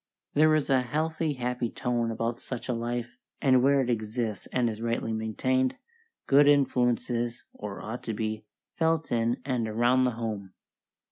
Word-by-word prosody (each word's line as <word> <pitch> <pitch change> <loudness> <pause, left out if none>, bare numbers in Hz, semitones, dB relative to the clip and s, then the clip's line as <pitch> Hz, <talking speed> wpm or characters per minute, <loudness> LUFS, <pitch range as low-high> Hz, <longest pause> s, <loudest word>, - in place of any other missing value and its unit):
There 155 +1 +5
is 155 - +1
a 130 -1 +5
healthy, 155 +4 -1
happy 125 -2 -2
tone 120 -1 -1
about 115 +1 -2
such 125 -2 -6
a 125 - 0
life, 120 +1 -4 0.2
and 130 -3 +4
where 140 +1 +4
it 125 - -1
exists 110 -1 -2
and 125 -2 +1
is 110 -1 -4
rightly 115 -1 -1
maintained, 130 +4 0 0.5
good 140 +1 +6
influence 125 -4 +3
is, 120 0 -2
or 105 -2 -7
ought 115 +3 -5
to 115 - -2
be, 110 0 -3 0.4
felt 160 -1 +1
in 115 0 +1
and 125 -4 0
around 120 +4 +3
the 125 -1 +3
home. 105 -5 -4
120 Hz, 165 wpm, -28 LUFS, 115-130 Hz, 0.5 s, good